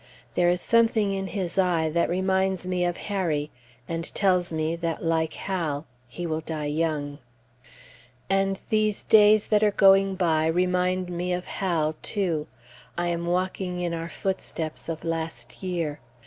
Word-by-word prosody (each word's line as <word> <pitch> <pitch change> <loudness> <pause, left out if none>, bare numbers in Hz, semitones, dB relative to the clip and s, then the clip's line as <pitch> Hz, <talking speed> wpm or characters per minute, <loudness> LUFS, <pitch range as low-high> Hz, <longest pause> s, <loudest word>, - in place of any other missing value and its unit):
There 175 0 +3
is 175 0 +1
something 225 -3 +3
in 195 0 -2
his 190 -2 -2
eye 175 -4 +2
that 170 +2 +1
reminds 190 +1 0
me 180 -1 0
of 175 0 -1
Harry, 165 -7 -1 0.4
and 165 0 -4
tells 180 -3 +2
me 160 +1 -1
that, 165 -1 -3
like 160 -1 +1
Hal, 165 -6 -2 0.2
he 175 +9 -6
will 160 -1 -2
die 155 -1 -4
young. 145 -1 -1 1.1
And 195 0 +1
these 215 -1 +1
days 215 -1 +6
that 210 -1 +4
are 210 - +5
going 195 -1 +5
by 160 -4 +2
remind 180 +1 +1
me 175 +1 -2
of 180 0 -3
Hal, 165 -5 -1
too. 170 -7 -1 0.5
I 175 0 0
am 170 0 -2
walking 180 0 -1
in 175 -1 -1
our 165 0 -4
footsteps 170 -5 -4
of 160 -1 -4
last 160 -7 -4
year. 170 -6 -2
175 Hz, 155 wpm, -26 LUFS, 160-190 Hz, 1.1 s, days